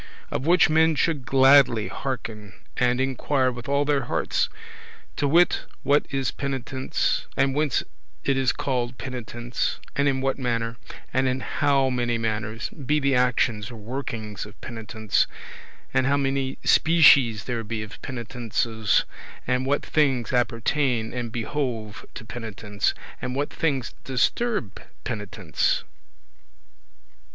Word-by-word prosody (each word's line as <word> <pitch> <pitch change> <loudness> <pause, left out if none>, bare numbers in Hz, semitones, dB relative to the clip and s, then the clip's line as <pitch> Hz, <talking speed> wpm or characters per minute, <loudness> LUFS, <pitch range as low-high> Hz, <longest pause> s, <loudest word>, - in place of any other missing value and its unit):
Of 135 - -2
which 175 +1 +6
men 160 +1 +4
should 145 -4 0
gladly 135 -5 +6
hearken 110 -3 -5 0.2
and 125 0 +2
inquire 130 0 +1
with 120 +1 -8
all 140 +1 +2
their 145 -1 +1
hearts, - - 0 0.7
to 145 - +1
wit 170 +5 +4 0.2
what 145 +1 +3
is 135 -2 -1
penitence, 135 -1 -2
and 135 -1 +3
whence 150 -2 +1 0.4
it 140 - +2
is 130 -1 +2
called 125 -2 -2
penitence, 120 -1 -3 0.2
and 140 0 +2
in 135 -1 +1
what 135 +1 -1
manner, 115 -2 -1 0.4
and 130 0 +2
in 130 +1 0
how 140 -2 +2
many 120 -2 0
manners, 110 0 -2
be 150 +1 -1
the 140 -1 +2
actions 120 -4 +1
or 120 - -9
workings 110 -3 -5
of 105 - -16
penitence, 110 -3 -1 0.7
and 130 - +3
how 140 +1 +3
many 135 -1 -1
species 140 -9 +6
there 120 -2 -3
be 110 0 -4
of 110 +3 -11
penitences, 115 -3 0 0.4
and 125 +1 0
what 145 +1 +1
things 135 -6 +1
appertain 120 -1 +1
and 120 -2 -4
behove 115 -3 -3
to - - -8
penitence, 110 -3 -3 0.3
and 125 0 -3
what 145 +2 -1
things 135 -7 -1
disturb 135 - 0 0.2
penitence. 100 -7 -1
125 Hz, 130 wpm, -25 LUFS, 115-140 Hz, 0.7 s, which